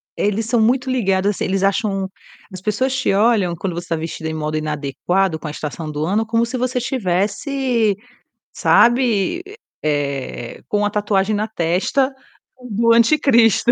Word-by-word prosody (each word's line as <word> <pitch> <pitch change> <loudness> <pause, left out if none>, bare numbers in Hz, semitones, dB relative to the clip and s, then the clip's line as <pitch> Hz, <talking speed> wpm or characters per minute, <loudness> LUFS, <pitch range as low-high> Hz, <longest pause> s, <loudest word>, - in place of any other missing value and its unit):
eles 210 +2 0
são 230 0 +1
muito 255 +4 +2
ligados 195 -5 +1
assim, 205 - -3
eles 190 +1 0
acham 195 -1 0 0.5
as 185 - -8
pessoas 255 +7 0
te - - +1
olham 200 -4 +2
quando 180 +2 -3
você 175 0 -6
tá 165 - +1
vestida 160 0 -5
em - - -4
modo 155 0 -2
inadequado 155 +4 -1
com 155 - -7
a - - -4
estação 155 +1 -5
do 150 +1 -2
ano 210 +6 +1
como 230 +1 +1
se 250 +2 -4
você 255 +1 -1
estivesse, 230 +1 0 0.6
sabe, 240 - +3 0.4
eh, 140 -5 -3
com 205 0 0
a - - +1
tatuagem 205 0 0
na 210 +1 -1
testa, 215 +8 0 0.6
do 230 +2 +3
anticristo. 235 -2 +4
205 Hz, 160 wpm, -19 LUFS, 170-235 Hz, 0.6 s, anticristo